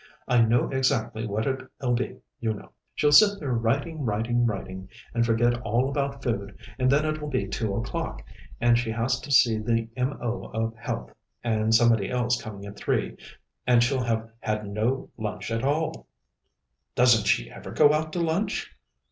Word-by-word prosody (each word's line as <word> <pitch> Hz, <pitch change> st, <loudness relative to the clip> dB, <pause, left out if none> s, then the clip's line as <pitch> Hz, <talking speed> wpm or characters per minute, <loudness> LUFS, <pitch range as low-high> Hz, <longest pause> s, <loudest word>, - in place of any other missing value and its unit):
"I 125 Hz, -1 st, +4 dB
know 115 Hz, +1 st, +3 dB
exactly 130 Hz, -4 st, 0 dB
what 110 Hz, +2 st, -1 dB
it'll 130 Hz, -1 st, -2 dB
be, 120 Hz, +1 st, -2 dB, 0.2 s
you 110 Hz, -2 st, -1 dB
know. -, -, -12 dB, 0.2 s
She'll 150 Hz, -, +3 dB
sit 200 Hz, +7 st, +7 dB
there 140 Hz, -5 st, -2 dB
writing, 140 Hz, +8 st, 0 dB
writing, 120 Hz, +2 st, +1 dB
writing, 95 Hz, -3 st, -5 dB, 0.2 s
and 115 Hz, 0 st, +2 dB
forget 120 Hz, +1 st, +2 dB
all 120 Hz, +3 st, +1 dB
about 140 Hz, -1 st, -2 dB
food, 100 Hz, -5 st, -3 dB, 0.2 s
and 130 Hz, 0 st, +3 dB
then 145 Hz, +2 st, +3 dB
it'll 155 Hz, -1 st, -2 dB
be 115 Hz, -8 st, -1 dB
two 105 Hz, 0 st, -2 dB
o'clock, 115 Hz, +3 st, -4 dB, 0.4 s
and 120 Hz, 0 st, +4 dB
she 120 Hz, -1 st, -2 dB
has 120 Hz, +3 st, 0 dB
to 135 Hz, -, -8 dB
see 115 Hz, -4 st, +5 dB
the 115 Hz, +1 st, 0 dB
M.O. 125 Hz, -2 st, -2 dB
of 115 Hz, +1 st, -2 dB
Health 115 Hz, -, -5 dB, 0.3 s
and 110 Hz, -1 st, +2 dB
somebody 115 Hz, -3 st, +4 dB
else 125 Hz, -1 st, 0 dB
coming 100 Hz, -3 st, -8 dB
at 100 Hz, 0 st, -9 dB
three -, -, -1 dB, 0.5 s
and 120 Hz, -1 st, +5 dB
she'll 130 Hz, +1 st, +1 dB
have 115 Hz, -1 st, -1 dB
had 110 Hz, -1 st, -2 dB
no 110 Hz, +6 st, -1 dB
lunch 110 Hz, +1 st, -4 dB
at 115 Hz, +1 st, -1 dB
all." 150 Hz, +4 st, -1 dB, 0.9 s
"Doesn't 120 Hz, -4 st, +5 dB
she -, -, +1 dB
ever -, -, -9 dB
go 150 Hz, -1 st, +5 dB
out 155 Hz, +1 st, -1 dB
to 175 Hz, -, -1 dB
lunch?" 175 Hz, +6 st, -1 dB
120 Hz, 175 wpm, -26 LUFS, 110-135 Hz, 0.9 s, sit